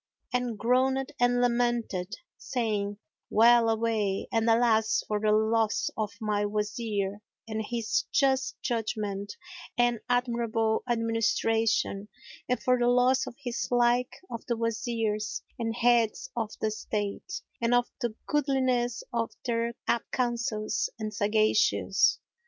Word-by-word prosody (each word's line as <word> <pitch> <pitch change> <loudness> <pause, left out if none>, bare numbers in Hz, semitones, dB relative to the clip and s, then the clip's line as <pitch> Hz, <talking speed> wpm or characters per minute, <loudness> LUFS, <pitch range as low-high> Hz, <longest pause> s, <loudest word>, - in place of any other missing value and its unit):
and 245 -3 -1
groaned 260 +4 +1
and 245 0 +3
lamented, 235 -5 0 0.2
saying 210 -4 -2 0.3
"Well 230 +1 +5
away 220 -3 0
and 225 0 +2
alas 225 -1 +3
for 210 -1 0
the 215 0 +2
loss 220 0 +2
of 215 -1 -2
my 210 -2 0
Wazir 210 -1 -2 0.3
and 220 0 -3
his 230 0 -1
just 270 -1 +1
judgment 210 -4 -2 0.4
and 240 -1 +3
admirable 235 -3 +1
administration 225 -2 +1 0.4
and 250 - +1
for 250 -1 +3
the 240 - +2
loss 250 +1 +3
of - - -7
his 245 -2 -2
like 245 0 +2 0.2
of 235 - -5
the 235 - 0
Wazirs 225 -2 -2 0.2
and 225 -1 -2
Heads 235 -2 +2
of 225 -3 -1
the 215 - 0
State 215 - -4 0.2
and 235 +1 +3
of 245 0 +3 0.2
the 235 -3 -2
goodliness 260 -5 +1
of 230 -1 -1
their 235 -1 -1
apt 235 - 0
counsels 235 -3 -1
and 215 -1 -4
sagacious!" 215 +1 +3
230 Hz, 125 wpm, -28 LUFS, 215-245 Hz, 0.4 s, Well